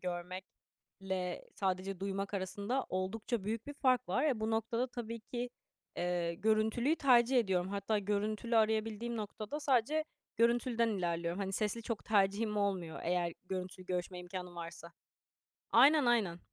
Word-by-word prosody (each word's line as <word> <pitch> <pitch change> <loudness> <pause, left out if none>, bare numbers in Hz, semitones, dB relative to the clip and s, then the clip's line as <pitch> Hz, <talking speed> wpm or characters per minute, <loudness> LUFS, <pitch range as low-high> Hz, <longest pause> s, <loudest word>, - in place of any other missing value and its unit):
görmekle 185 +1 -5
sadece 190 -1 -1
duymak 195 +1 -2
arasında 200 +7 -2
oldukça 205 +4 -2
büyük 225 +3 -3
bir 290 - -6
fark 255 -4 +2
var. 185 - +1
E, 265 -8 +1
bu 220 +1 0
noktada 225 +2 0
tabii 230 -2 -6
ki, 245 +2 -4 0.5
eee, 175 -1 0
görüntülüyü 220 - +2
tercih 250 -3 +5
ediyorum. 190 -5 +1
Hatta 200 +2 0
görüntülü 210 +3 0
arayabildiğim 220 +1 +1
noktada 215 +6 -5
sadece 285 +3 +2 0.3
görüntülüden 235 0 +3
ilerliyorum. 170 -3 -1
Hani, 195 -1 -2
sesli 215 +3 -1
çok 230 -1 -4
tercihim 210 +1 +2
olmuyor, 190 -5 -1
eğer 175 0 0
görüntülü 185 0 -5
görüşme 180 0 -2
imkânım 180 0 -7
varsa. 170 0 -8 0.8
Aynen, 280 +4 +7
aynen. 215 -8 +2
205 Hz, 135 wpm, -34 LUFS, 185-235 Hz, 0.8 s, Aynen